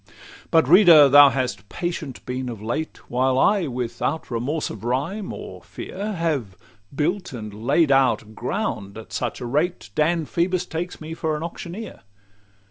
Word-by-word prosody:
LXXIV - - -23 0.4
But, 160 -4 +4
reader, 165 -4 +8
thou 145 +1 +9
hast 125 -5 -3
patient 165 -6 -5
been 125 0 -3
of 115 -3 -7
late, 120 +9 -4
While 130 +1 +1
I, 195 +3 +3
without 125 +4 -3
remorse 135 +7 -2
of 110 - -9
rhyme, 145 - -2
or - - -8
fear, 205 +3 -6
Have 150 - -2 0.4
built 175 +6 -1
and 110 -4 -7
laid 160 -4 +4
out 115 -5 +2
ground 115 - -3
at 110 - -11
such - - -3
a - - -4
rate, 150 +9 -1
Dan 160 +1 +1
Phoebus 180 +3 0
takes 175 +1 -5
me 155 +1 -6
for 160 -2 -2
an 155 - -6
auctioneer. 175 +5 -7
150 Hz, 160 wpm, -23 LUFS, 125-170 Hz, 0.4 s, thou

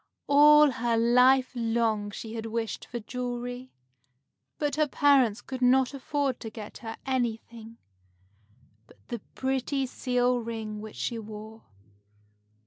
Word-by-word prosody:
All 295 0 +7
her 235 -1 0
life 250 +3 +4
long 225 -3 0
she 220 +2 -8
had 225 -1 -5
wished 225 0 -4
for 240 - -6
jewelry, 245 +2 -5 0.9
but 290 -2 -1
her 305 0 +2
parents 265 -6 +3
could 260 -1 -7
not 255 +1 +4
afford 275 -1 -2
to 225 - -6
get 215 -1 -9
her 225 -1 -7
anything 230 -3 -3 1.1
but - - -20
the 235 - -4 0.2
pretty 265 +1 -1
seal 250 -1 0
ring 220 -2 -5
which 215 0 -9
she 235 -2 -3
wore. 220 +1 -10
245 Hz, 130 wpm, -28 LUFS, 225-260 Hz, 1.1 s, All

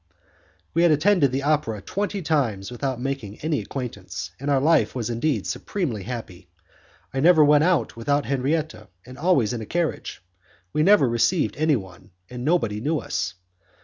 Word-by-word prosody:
We 165 - +2
had 175 - +5
attended 155 -2 +3
the 135 +1 -2
opera 145 -8 0
twenty 200 - -3
times 120 -10 0
without 130 0 -3
making 125 -6 -4
any 155 -1 0
acquaintance, 95 - -6
and 140 +2 -3
our 140 -2 +3
life 155 +1 +3
was 120 -2 -2
indeed 120 -2 -1
supremely 150 - -3
happy. 110 -4 -7 0.6
I 135 - -1
never 160 +1 +6
went 150 +1 +5
out 180 -2 +1
without 140 +5 0
Henriette, 145 +4 -2 0.2
and 130 +1 -11
always 140 - +2
in 115 - -4
a - - -6
carriage; 170 - -3 0.5
we 150 - +1
never 195 -4 +5
received 120 +9 +1
anyone, 115 - -1 0.2
and 125 -1 -6
nobody 115 -10 +1
knew 155 +5 0
us. 90 -9 -3
135 Hz, 160 wpm, -24 LUFS, 115-155 Hz, 0.6 s, never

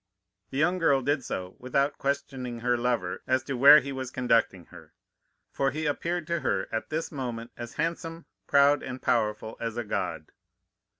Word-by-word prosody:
"The 135 - -5
young 175 +5 +2
girl 140 -5 +3
did 145 -1 0
so 90 -3 -5
without 140 +3 0
questioning 135 -4 -3
her 120 +1 +2
lover 120 -7 -1
as 130 0 +2
to 135 - -4
where 140 +4 +8
he 140 - -6
was 130 -2 -4
conducting 115 -8 +1
her, - - -14 0.6
for 135 - +1
he 155 +3 -4
appeared 170 +3 -1
to 170 +1 -1
her 95 -9 -1
at 110 - -3
this 160 +1 -3
moment 120 -5 -5
as 120 -1 -7
handsome, 165 +1 -3 0.2
proud, 140 +1 +5
and 130 0 -6
powerful 110 -2 -1
as 115 0 -4
a 120 - -1
god. 105 - -3
130 Hz, 175 wpm, -28 LUFS, 120-145 Hz, 0.6 s, where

